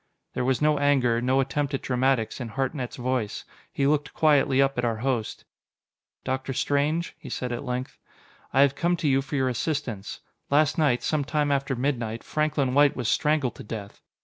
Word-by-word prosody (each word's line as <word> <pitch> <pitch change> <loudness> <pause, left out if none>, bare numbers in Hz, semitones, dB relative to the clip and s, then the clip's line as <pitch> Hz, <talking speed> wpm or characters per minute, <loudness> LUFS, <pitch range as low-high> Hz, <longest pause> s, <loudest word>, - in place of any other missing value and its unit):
There - - -1
was 130 +3 +1
no 150 -1 +3
anger, 130 -5 +2
no 130 +2 +2
attempt 140 +1 -1
at - - -5
dramatics, 125 -2 0
in 120 - -4
Hartnett's 130 +1 -3
voice. 125 -4 -2 0.3
He 140 - 0
looked 150 +1 0
quietly 140 -3 +3
up 135 0 +3
at - - 0
our 115 -2 0
host. 120 -5 -2 0.8
"Dr. 130 +1 -2
Strange," 145 +6 0
he - - -10
said 125 -1 -3
at 120 - -4
length, 125 +1 -4 0.5
"I 135 - +4
have 140 -1 +5
come 175 +4 0
to 160 - -1
you 135 -1 +3
for 140 +2 -6
your 130 -2 +1
assistance. 125 -6 -3 0.3
Last 150 +2 +3
night, 140 -6 +2
some 155 -2 0
time 145 0 0
after 140 -1 0
midnight, 120 -4 -2
Franklin 150 -4 0
White 145 0 +5
was 125 -3 -2
strangled 150 -5 +1
to - - -8
death. 105 -2 -8
135 Hz, 185 wpm, -26 LUFS, 125-145 Hz, 0.8 s, have